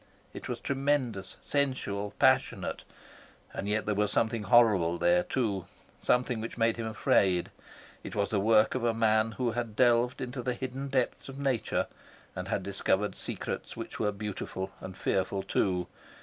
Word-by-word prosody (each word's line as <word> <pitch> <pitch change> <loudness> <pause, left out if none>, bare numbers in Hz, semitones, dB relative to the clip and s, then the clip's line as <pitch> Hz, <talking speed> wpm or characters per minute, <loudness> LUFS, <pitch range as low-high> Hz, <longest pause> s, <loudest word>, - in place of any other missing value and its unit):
It - - -7
was - - -3
tremendous, 135 -8 -1
sensual, 105 -8 -1
passionate; - - +2 0.7
and 100 - -3
yet 105 +1 0
there 105 - +1
was 105 0 +1
something 115 +1 +1
horrible 105 -7 +4
there, 175 - +4
too, 110 - -1 0.3
something 125 -2 +1
which 115 - -6
made 115 0 +2
him 115 -1 -3
afraid. 95 -4 +2 0.5
It - - -7
was 100 -1 +1
the 105 - +1
work 110 +1 +4
of 130 - -2
a 115 -1 +2
man 110 0 +3
who 120 0 0
had 115 -1 -3
delved 120 +1 +3
into 125 0 -4
the 125 0 -1
hidden 130 +2 -4
depths 135 0 -1
of 135 - -8
nature 135 -5 0 0.5
and 90 +1 -4
had 95 - -1
discovered 100 +1 0
secrets - - -5
which - - -6
were 105 - +1
beautiful 100 -2 -5
and 95 0 -8
fearful 95 +1 0
too. 90 -2 0
110 Hz, 165 wpm, -30 LUFS, 100-125 Hz, 0.7 s, horrible